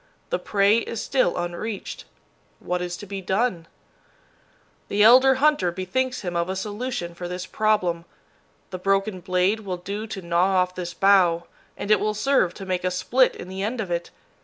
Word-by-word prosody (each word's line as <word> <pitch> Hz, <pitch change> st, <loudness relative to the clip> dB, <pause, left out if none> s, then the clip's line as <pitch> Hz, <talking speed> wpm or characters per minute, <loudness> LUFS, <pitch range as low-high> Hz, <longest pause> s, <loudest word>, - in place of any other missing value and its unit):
The -, -, 0 dB
prey 205 Hz, +2 st, +3 dB
is 230 Hz, -1 st, -5 dB
still 255 Hz, -9 st, +1 dB
unreached. 175 Hz, +4 st, -5 dB, 0.5 s
What 180 Hz, 0 st, -2 dB
is 175 Hz, 0 st, -4 dB
to 205 Hz, -, -9 dB
be 195 Hz, 0 st, -6 dB
done? 190 Hz, -3 st, -1 dB, 1.2 s
The 205 Hz, +1 st, +2 dB
elder 260 Hz, +4 st, +7 dB
hunter 270 Hz, -10 st, +2 dB
bethinks 250 Hz, +9 st, -2 dB
him 175 Hz, -3 st, -4 dB
of 170 Hz, +1 st, 0 dB
a 190 Hz, -, -2 dB
solution 205 Hz, -2 st, -4 dB
for 175 Hz, +1 st, -6 dB
this 180 Hz, +1 st, -5 dB
problem. 185 Hz, -6 st, 0 dB, 0.7 s
The 185 Hz, -, -5 dB
broken 195 Hz, +1 st, 0 dB
blade 185 Hz, +3 st, +1 dB
will 190 Hz, -4 st, -5 dB
do 200 Hz, +5 st, -5 dB
to 195 Hz, -4 st, -7 dB
gnaw 175 Hz, +3 st, +2 dB
off 180 Hz, 0 st, +2 dB
this 175 Hz, -2 st, -6 dB
bough, 180 Hz, -4 st, +4 dB, 0.3 s
and 205 Hz, -, -3 dB
it 215 Hz, -, +6 dB
will 215 Hz, 0 st, -1 dB
serve 215 Hz, -5 st, +2 dB
to 195 Hz, -, -8 dB
make 185 Hz, -1 st, -2 dB
a 185 Hz, -, +1 dB
split 245 Hz, +8 st, +2 dB
in -, -, -9 dB
the 190 Hz, +1 st, -6 dB
end 225 Hz, +5 st, -2 dB
of 195 Hz, -5 st, -3 dB
it. 170 Hz, 0 st, -2 dB
190 Hz, 185 wpm, -24 LUFS, 180-215 Hz, 1.2 s, elder